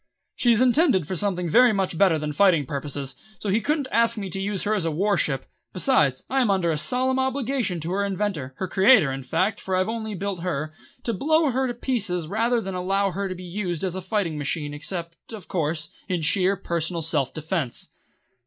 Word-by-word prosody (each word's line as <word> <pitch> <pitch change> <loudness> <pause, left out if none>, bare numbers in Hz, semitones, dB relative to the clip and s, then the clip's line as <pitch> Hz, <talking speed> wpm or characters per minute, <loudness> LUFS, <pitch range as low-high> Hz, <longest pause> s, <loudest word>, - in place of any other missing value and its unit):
She 240 - +3
is 230 0 +3
intended 255 - +3
for 185 - -3
something 180 -1 0
very 245 +8 +6
much 190 -3 -1
better 175 -2 +4
than 150 -1 -3
fighting 170 -4 +4
purposes, 140 0 -4 0.2
so 205 - -4
he 210 +4 +2
couldn't 290 +3 0
ask 230 +1 +3
me 195 -3 -4
to 195 - -2
use 200 -1 -2
her 215 - +1
as 205 -5 0
a 165 - 0
war 195 +6 +1
ship; 135 -7 0 0.3
besides, 155 - +2
I 270 0 +1
am 240 - +2
under 185 -4 +2
a 155 - -1
solemn 260 +7 +1
obligation 260 -7 -1
to 165 +3 -4
her 200 +2 0
inventor 190 -9 -2
her 190 - -3
creator, 195 - +5
in 135 0 -4
fact, 190 +10 0
for 190 - -2
I've 185 0 +1
only 220 -2 -4
built 195 0 -3
her 155 -3 -3 0.3
to 235 - 0
blow 315 - +2
her 260 +1 0
to 240 - -4
pieces 205 -9 -1
rather 230 +7 +1
than 195 -3 -5
allow 195 +2 0
her 195 +2 -3
to 185 - -4
be 180 - -9
used 175 -2 -3
as 185 -2 -1
a 190 - -3
fighting 185 -5 -1
machine 145 0 -2
except, 170 +2 -4 0.2
of 210 -4 -9
course, 160 -2 -2 0.2
in 175 -3 -1
sheer 185 +5 +3
personal 170 -1 -2
self 150 -5 0
defence. 155 -4 -3
190 Hz, 215 wpm, -24 LUFS, 165-220 Hz, 0.3 s, very